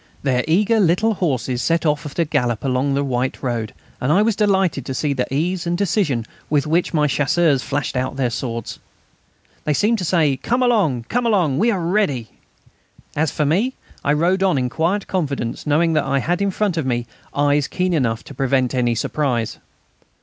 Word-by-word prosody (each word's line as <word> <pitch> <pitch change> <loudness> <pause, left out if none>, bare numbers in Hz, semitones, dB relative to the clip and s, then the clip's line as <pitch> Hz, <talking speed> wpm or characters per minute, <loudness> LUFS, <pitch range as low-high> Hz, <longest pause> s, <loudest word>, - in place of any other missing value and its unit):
Their 125 -3 +1
eager 210 +7 +3
little 200 +4 +3
horses 130 - -1
set 165 +6 +1
off 150 0 0
at 140 - -11
a 170 - +2
gallop 120 -6 -1
along 135 +1 +1
the 140 - +1
white 130 0 -2
road, 120 -4 -2 0.3
and 130 - +1
I 195 +6 +4
was 225 -1 +1
delighted 195 - +1
to 130 - -3
see 145 0 0
the 130 -1 -2
ease 170 +5 -1
and 175 0 0
decision 170 - 0 0.2
with 145 -1 +2
which 165 +3 +1
my 150 -3 +2
Chasseurs 145 +1 +2
flashed 145 +1 -3
out 130 +1 -1
their 130 -3 0
swords. 115 -1 -4 0.8
They 150 - 0
seemed 220 +5 +2
to - - -3
say, 160 -6 +2
"Come 245 - 0
along, 195 - +2
come 240 - -1
along...; 175 -11 +2
we 225 +4 +3
are 200 -5 0
ready." 165 - 0 0.9
As 155 +1 +1
for 150 - -1
me, 205 - +1 0.3
I 145 - +2
rode 175 +5 +2
on 190 -6 +3
in 125 -1 0
quiet 175 +9 0
confidence, 145 -9 -3
knowing 160 +3 +3
that 155 - +2
I 135 0 +1
had 175 +8 0
in 200 - +2
front 195 -2 -1
of 160 - -1
me 120 -1 -1 0.3
eyes 145 0 +2
keen 180 0 -1
enough 115 -7 0
to - - -11
prevent 130 -1 +1
any 120 -2 +1
surprise. 120 -1 -1
150 Hz, 195 wpm, -20 LUFS, 130-180 Hz, 0.9 s, I